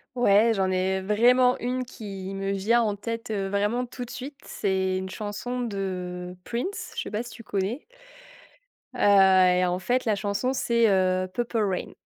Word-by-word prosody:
Ouais, 225 -1 +4
j'en 190 -1 +1
ai 190 +1 0
vraiment 245 +5 +4
une 255 +1 -2
qui 195 -6 -7
me 195 0 -2
vient 210 +5 +2
en 210 -3 0
tête, 230 +3 -5
heu, 195 -2 -2
vraiment, 210 +5 0
tout 245 0 -7
de 240 - -15
suite, 275 +3 -7
c'est 190 -1 -1
une 190 0 -4
chanson 215 +5 -5
de 180 -5 -4
Prince. 250 +13 -4
Je - - -2
sais - - -6
pas 210 +1 -1
si 240 - -9
tu 230 - -11
connais? 205 +7 -3 1.1
Heu, - - -8 0.6
et 180 - +3
en 180 0 -1
fait, 245 +7 0
la 220 -2 +2
chanson, 205 +6 -1
c'est, 235 -3 +2
heu, 185 -1 +2
Purple 240 +2 -2
Rain, 195 -4 -1
205 Hz, 180 wpm, -26 LUFS, 190-240 Hz, 1.1 s, Ouais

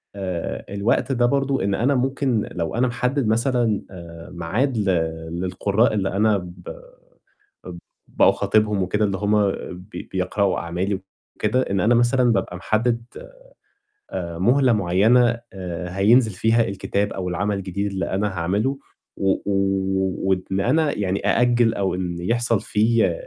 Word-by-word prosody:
آآ، 95 -4 -4
الوقت 105 +6 0
ده 120 -2 +2
برضه 135 0 +1
إن 100 0 0
أنا 130 +7 +1
ممكن 130 -3 0
لو 85 +1 -3
أنا 125 +2 +2
محدِّد 125 +1 -1
مثلًا 115 -1 +1
آآ، 85 -2 -10
ميعاد 105 +10 -1
ل 105 - 0 0.6
للقُرّاء 100 +5 +1
اللي 100 -2 0
أنا 105 +2 +2
ب 90 -1 -9 1.0
اب 85 -1 -8 0.3
باخاطبهم 105 -1 +2
وكده، 105 +4 0
اللي 100 -2 -1
هم 105 0 +2 0.3
بي 95 +4 -10
بيقرأوا 95 +1 0
أعمالي 95 +3 -2 0.3
وكده، 130 - +1
إن 100 - +1
أنا 110 +6 +3
مثلًا 120 +1 +3
بابقى 95 -3 -2
محدِّد 115 +5 0 1.1
آآ، 85 -2 -4
مهلة 125 +6 +3
معيّنة 115 +5 +3
آآ، 90 -2 -5
هينزل 110 +3 +4
فيها 110 +4 +2
الكتاب 100 +1 -2
أو 90 -1 -4
العمل 100 +3 -1
الجديد 95 +1 -3
اللي 95 0 -2
أنا 100 +2 0
هاعملُه، 100 +9 -1 0.4
و 95 0 +2
و 100 - 0 0.8
وإن 95 0 0
أنا 145 +8 +1
يعني 100 -1 -1
أأجِّل 120 -1 +3
أو 95 -2 -1
إن 90 -2 -3
يحصل 115 +3 +1
في 110 +2 +2
105 Hz, 140 wpm, -22 LUFS, 95-120 Hz, 1.1 s, هينزل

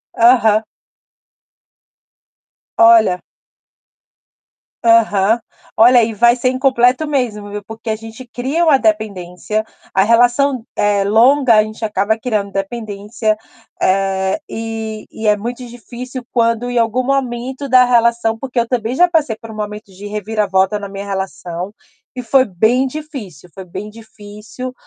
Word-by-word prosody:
Aham. 225 -2 +4 2.1
Olha. 225 -5 +5 1.6
Aham. 225 -1 +4 0.4
Olha, 240 +1 +6
e 225 - -1
vai 235 +3 +4
ser 255 +1 0
incompleto 255 +2 +2
mesmo, 230 -8 -2
viu. 205 0 -6
Porque 225 +1 -8
a 220 - 0
gente 225 +3 -11
cria 265 +8 -1
uma 300 -4 +5
dependência, 210 -3 -2 0.3
a 190 - +4
relação, 245 +3 +2
eh, 205 -1 +1
longa 240 +4 +4
a 215 - +5
gente 215 +1 -6
acaba 210 +1 0
criando 215 -4 -2
dependência, 210 +1 -3 0.4
eh, 190 +4 +1
e 220 -1 -5
e 220 - -8
é 210 0 +4
muito 240 +4 -6
difícil 245 +2 -9
quando 230 0 +1
em 245 - -2
algum 230 +2 +1
momento 265 +1 -2
da 250 0 +6
relação 235 -2 +2
porque 255 0 -3
eu 230 - 0
também 235 -1 -2
já 355 +5 +5
passei 295 -10 0
por 225 - -12
um - - -10
momento 210 -1 -6
de 195 +2 -11
reviravolta 205 -1 0
na 200 -1 -7
minha 195 0 -7
relação 190 -1 -5 0.4
e 250 - -4
foi 255 +2 +3
bem 220 +7 +1
difícil, 260 - -8
foi 190 - -9
bem 190 +4 -7
difícil, 220 +2 -10
225 Hz, 140 wpm, -17 LUFS, 205-245 Hz, 2.1 s, Olha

